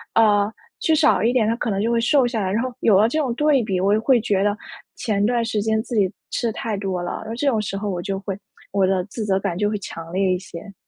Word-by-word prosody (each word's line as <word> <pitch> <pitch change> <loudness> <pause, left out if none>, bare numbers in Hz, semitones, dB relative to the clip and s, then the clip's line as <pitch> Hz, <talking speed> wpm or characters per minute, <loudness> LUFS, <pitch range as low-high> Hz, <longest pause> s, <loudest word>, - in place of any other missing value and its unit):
呃， 210 -2 +4 0.3
吃 320 - +2
少 310 -1 +4
一 230 - +3
点， 245 -4 +2
它 225 - +1
可 235 - -2
能 195 -2 -1
就 230 +2 0
会 235 -1 +2
瘦 265 +3 +3
下 235 -3 -1
来。 185 -1 -1
然 225 +4 0
后 255 -1 -4
有 200 -4 +4
了 215 - +5
这 305 +7 -1
种 265 -6 0
对 295 -1 +3
比， 195 -4 -1
我 195 +2 +2
就 215 - +2
会 255 +1 +4
觉 200 -3 +1
得 205 0 +1 0.4
前 205 -3 -1
段 235 +1 +1
时 220 -2 -1
间 220 +1 +1
自 240 - -5
己 195 -4 +2 0.2
吃 240 - -1
的 225 - -2
太 220 0 -3
多 190 -2 -3
了， 175 - -4
那 225 - -4
这 250 - -2
种 225 -6 +2
时 205 -2 -4
候 205 +1 -4
我 175 -2 -3
就 195 +2 -3
会 195 -1 -4 0.4
我 195 -1 +2
的 185 -1 +1
自 215 +3 -6
责 195 -2 +1
感 175 - -2
就 205 +3 0
会 210 - -1
强 165 -4 -8
烈 190 0 +1
一 180 - -1
些。 185 +2 -10
210 Hz, 310 characters per minute, -22 LUFS, 195-235 Hz, 0.4 s, 了